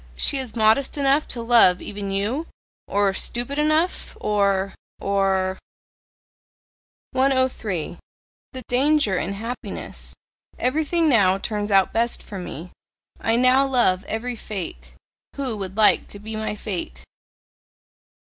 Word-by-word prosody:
She 275 - +3
is 255 -4 -6
modest 225 +6 +3
enough 280 +1 +2
to 235 -1 -4
love 230 -6 +5
even 200 -1 -6
you? 215 +12 -1 0.4
Or 200 -1 +2
stupid 245 +8 -1
enough? 310 +4 +1
Or 200 -2 +1 0.3
or 190 -1 0 0.8
" - - -93
103. 260 - 0 0.5
THE 260 -1 -7
DANGER 260 -6 +2
IN 180 +7 -3
HAPPINESS. 230 +5 -6 0.4
"Everything 315 +5 +1
now 200 -9 +4
turns 210 +1 -3
out 195 -2 +3
best 235 +1 0
for 200 -3 -7
me, 175 -1 -7 0.5
I 225 - +1
now 255 +3 +4
love 220 -8 +2
every 240 +3 -3
fate: 165 - -7 0.4
who 265 -5 -3
would 190 0 -6
like 215 -1 +4
to - - -6
be 215 +2 -7
my 215 -1 -3
fate?" 170 - -5
220 Hz, 125 wpm, -23 LUFS, 195-260 Hz, 0.8 s, love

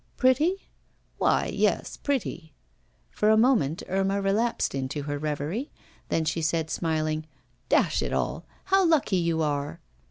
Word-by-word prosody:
'Pretty?' 305 +9 +2 0.6
'Why, - - +3
yes, - - 0
pretty.' 175 - -3 0.6
For 210 - +1
a 220 - +5
moment 220 - +2
Irma 195 +1 0
relapsed 205 +4 0
into 135 +2 -3
her 145 0 -3
reverie, 155 - -3 0.4
then 160 - +1
she 165 +1 -1
said, 160 0 0
smiling: 155 -1 -1 0.4
'Dash - - +3
it - - -2
all! - - -1 0.2
How 385 0 +3
lucky 310 - +3
you 170 -2 +1
are! 145 -1 -2
170 Hz, 135 wpm, -26 LUFS, 155-235 Hz, 0.6 s, a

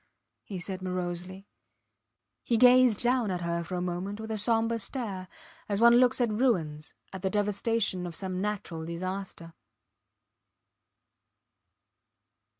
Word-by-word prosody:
he 195 - -7
said, 185 +1 -5
morosely. 180 +1 -4 1.0
He 235 - +1
gazed 250 -2 +6
down 245 -3 +2
at 180 -1 -2
her 170 0 -2
for 180 +2 -5
a 180 - -2
moment 180 +4 -4
with 220 0 -6
a 220 - -1
sombre 230 +2 +1
stare, 200 -4 -4 0.4
as 200 -1 0
one 235 +1 +7
looks 255 +1 +4
at 240 -3 +2
ruins, 165 - 0 0.2
at 190 - -6
the 190 - 0
devastation 205 -2 0
of 170 - -6
some 185 0 -3
natural 195 -6 -3
disaster. 170 0 -5
195 Hz, 130 wpm, -29 LUFS, 180-225 Hz, 1.0 s, one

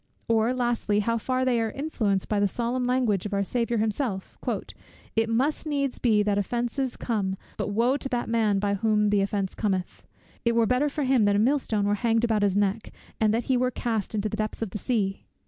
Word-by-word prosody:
or 225 +1 +3
lastly, 240 -4 0
how 230 +2 0
far 255 +3 0
they 245 -3 +2
are 225 - 0
influenced 220 -8 -1
by 210 - 0
the 200 - +3
solemn 240 +5 -2
language 245 -6 +1
of 205 - -3
our 200 - +1
Saviour 235 +3 -1
himself; 215 -2 -2 0.8
"It 225 0 +2
must 275 +7 0
needs 280 -3 -1
be 215 -4 +3
that 205 -1 +1
offences 240 +5 -2
come, 200 -5 -1 0.2
but - - -3
woe 235 +6 +2
to 270 - -6
that 245 -1 -1
man 220 -3 +2
by 200 0 0
whom 210 0 +2
the 205 -1 +3
offence 195 -1 -1
cometh; 190 -4 -2 0.4
it 235 - +2
were 230 -1 +4
better 250 +6 +2
for 295 +1 -2
him 260 -5 +3
that 205 0 +3
a - - +3
mill 260 +8 +3
stone 210 -5 -1
were 205 - +2
hanged 230 -1 +2
about 220 -3 +2
his 200 -1 +2
neck, 205 +2 0 0.3
and 215 -1 +3
that 230 +2 0
he 260 - +1
were 250 +1 +2
cast 225 -4 -2
into 210 0 0
the 215 - -4
depths 215 +1 -2
of 210 - -5
the 210 - -4
sea?" 200 -6 -1
225 Hz, 220 wpm, -26 LUFS, 205-245 Hz, 0.8 s, were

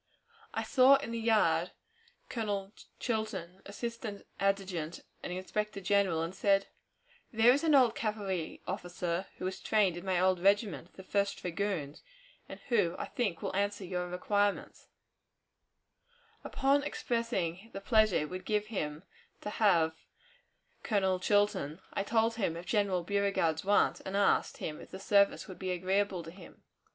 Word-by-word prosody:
I - - -2
saw 265 +1 +6
in 275 -4 -3
the 230 - -2
yard 225 -1 +2 0.5
Colonel 205 -3 -3 0.3
Chilton, 200 -6 -3
assistant 230 0 -6
adjutant 190 -5 -1 0.2
and - - -5
inspector 200 +3 -3
general, 190 -4 +2
and 165 +2 -4
said, 195 0 +2 0.7
"There 230 0 +6
is 285 - 0
an 315 -3 +4
old 250 -5 +5
cavalry 200 -7 -3
officer 180 -1 -3
who - - -5
was 185 0 -3
trained 205 -5 +2
in 175 - -7
my 190 -2 +1
old 185 0 +3
regiment, 200 -1 +1
the 190 - -11
First 200 +1 0
Dragoons, 175 -5 -3 0.5
and - - -8
who 200 -8 +2
I - - -3
think 205 -9 -2
will - - -3
answer 200 0 -1
your 180 0 -3
requirements," 205 +3 -1 1.6
Upon 275 +2 +2
his 290 - -3
expressing 225 - -2
the 195 - -6
pleasure 215 -1 +3
it 150 - -2
would 185 0 -5
give 210 -1 0
him 150 -3 -3 0.4
to 210 - -4
have 170 -8 +3 0.9
Colonel 190 -4 +1
Chilton, 200 -6 +1
I - - 0
told 225 +2 +1
him 190 -7 0
of 170 - -8
General 195 -2 +1
Beauregard's 195 -5 0
want, 205 +1 +3
and 190 +1 -3
asked 200 - +2
him 150 -1 -5
if - - -12
the 190 - -8
service 200 +1 +3
would 185 - -10
be 185 - -3
agreeable 185 0 0
to 165 - -9
him. 180 0 -15
195 Hz, 155 wpm, -31 LUFS, 180-215 Hz, 1.6 s, saw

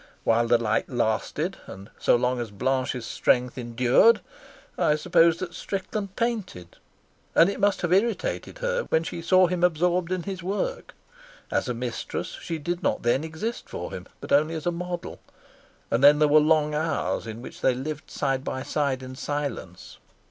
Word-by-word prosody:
While 115 +1 +3
the 120 0 +5
light 110 -1 0
lasted 120 - -1
and 95 +2 -10
so - - +4
long 125 +1 +1
as 115 - -5
Blanche's 125 +3 -1
strength 125 +2 +1
endured, 125 - +4 0.5
I 150 - +2
suppose 165 +1 +4
that 175 -1 -5
Strickland 195 0 -4
painted, 205 - -3 0.6
and 170 +4 +6
it 200 - -6
must 205 -1 +2
have 175 0 +2
irritated 235 - 0
her - - 0
when 160 - +2
she 170 - -5
saw 185 +2 +5
him 175 0 -1
absorbed 175 +1 +2
in 185 -2 -1
his 190 -1 -5
work. 345 - -3 0.6
As - - 0
a 125 - -1
mistress 120 0 -4
she 165 - -4
did 175 +3 -3
not - - 0
then 120 +5 +2
exist 160 +9 -5
for - - -6
him, - - -7
but - - -9
only 155 +3 +3
as 160 - -5
a 175 - +2
model; 175 0 -5 0.7
and 115 +4 +1
then 145 +1 +8
there 150 0 +4
were 150 +1 +6
long 150 0 +3
hours 155 -5 -1
in 115 +2 -7
which - - -10
they 130 - +3
lived 150 +4 -5
side 135 -2 -1
by 130 -1 -4
side 140 -3 -1
in 130 0 -8
silence. 140 -11 -5
155 Hz, 175 wpm, -26 LUFS, 125-180 Hz, 0.7 s, then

